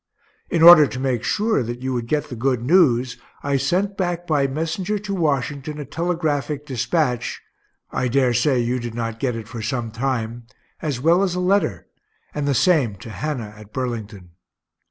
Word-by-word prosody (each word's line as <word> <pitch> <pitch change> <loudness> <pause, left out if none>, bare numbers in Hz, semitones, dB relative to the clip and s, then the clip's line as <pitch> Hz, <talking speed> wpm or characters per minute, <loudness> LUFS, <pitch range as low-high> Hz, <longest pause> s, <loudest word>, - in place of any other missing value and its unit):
In 165 -2 +1
order 170 -3 +10
to 130 +2 -6
make 130 -3 -1
sure 215 -3 +1
that 120 +1 -5
you 130 0 -1
would 120 -2 -3
get 150 +2 -1
the 125 - -6
good 125 0 0
news, 130 -6 +3 0.3
I 140 -1 +1
sent 185 +8 0
back 175 -2 -2
by 145 -4 +2
messenger 165 +8 -2
to 205 0 -5
Washington 145 -3 -1
a 145 - -5
telegraphic 150 -2 -2
dispatch 130 0 -1 0.5
(I 125 - -1
dare 125 0 +2
say 125 +3 +2
you 120 +1 0
did 120 -1 -6
not 115 -1 -3
get 125 -2 -1
it 115 -1 -7
for 115 0 -7
some 115 0 -3
time) 120 -1 -3 0.3
as 145 -6 -2
well 165 +7 +4
as 185 -3 0
a - - -1
letter 195 +3 +1 0.5
and 145 -1 -2
the 140 - +2
same 140 - +3
to 100 +4 -10
Hannah 120 -5 -4
at 105 -1 -14
Burlington. 110 -8 -5
135 Hz, 180 wpm, -22 LUFS, 120-160 Hz, 0.5 s, order